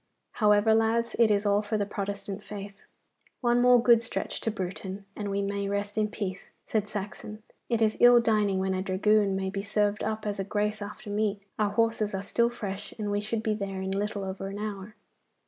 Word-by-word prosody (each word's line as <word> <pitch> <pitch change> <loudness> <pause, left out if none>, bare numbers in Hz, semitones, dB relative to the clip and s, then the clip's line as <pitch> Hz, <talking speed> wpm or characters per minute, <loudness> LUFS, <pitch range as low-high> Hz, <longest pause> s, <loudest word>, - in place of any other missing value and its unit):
However, 210 0 +4
lads, 225 +1 +2
it 230 -2 +6
is 205 0 +2
all 205 0 +3
for 215 +1 -2
the 205 - 0
Protestant 200 0 -4
faith.' 200 -1 -8 0.6
'One 240 -1 +3
more 250 0 +7
good 235 -1 +5
stretch 235 - -3
to - - 0
Bruton, 195 0 -5
and 205 -1 -4
we 200 0 -1
may 200 0 -2
rest 200 0 -2
in 215 -1 +2
peace,' 195 -3 -5 0.2
said 210 -2 -1
Saxon. 210 +1 -6 0.3
'It 230 -2 +2
is 215 0 +1
ill 245 0 +8
dining 210 -4 +2
when 190 0 0
a 185 - -1
dragoon 195 +1 +2
may 190 0 -2
be 195 0 -3
served 205 +1 0
up 215 0 -2
as 205 -1 -2
a - - 0
grace 210 +1 -1
after 205 +1 -7
meat. 205 -1 -1 0.2
Our 210 -1 +2
horses 215 -1 +1
are 195 - -3
still 235 +3 +2
fresh, 200 -5 -6
and 210 -2 -2
we 205 0 0
should 220 +1 -3
be 220 -2 +1
there 195 -2 -4
in 190 - -3
little 200 +1 -2
over 190 0 -4
an 195 +1 -6
hour. 210 0 -5
205 Hz, 210 wpm, -28 LUFS, 200-215 Hz, 0.6 s, ill